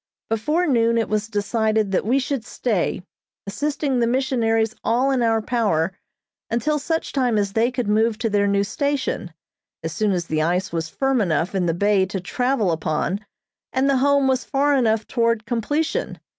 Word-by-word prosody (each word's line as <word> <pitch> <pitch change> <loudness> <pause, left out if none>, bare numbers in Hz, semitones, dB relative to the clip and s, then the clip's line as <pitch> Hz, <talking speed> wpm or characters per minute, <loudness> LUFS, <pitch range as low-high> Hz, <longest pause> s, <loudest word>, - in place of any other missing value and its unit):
Before 300 +11 +1
noon 230 -5 +2
it 225 - 0
was 215 +1 -1
decided 215 0 0
that 195 - 0
we 255 +4 +3
should 275 -3 -2
stay, 205 -7 -1 0.4
assisting 280 +5 -1
the 235 - +2
missionaries 230 -3 +1
all 250 +4 +2
in 260 -2 +1
our 225 -1 +2
power 195 -8 0 0.5
until 295 +7 0
such 325 +3 -2
time 250 -5 +1
as 200 -1 0
they 225 +2 +2
could 250 -3 -3
move 220 +1 +2
to 235 - -1
their 205 0 +2
new 200 0 +2
station, 265 - -2 0.5
as 165 - -3
soon 210 +4 +1
as 175 -3 -1
the 155 -1 -1
ice 180 +4 0
was 165 -1 -2
firm 270 +1 0
enough 170 -1 0
in 185 -3 0
the 165 - 0
bay 200 0 +2
to 190 0 -4
travel 235 +1 0
upon 165 +5 -1 0.5
and 260 +1 +1
the 275 -1 +3
Home 280 +1 +3
was 260 -1 +1
far 285 +1 +1
enough 225 -5 +2
toward 230 -2 0
completion. 290 +7 -1
225 Hz, 180 wpm, -22 LUFS, 200-260 Hz, 0.5 s, we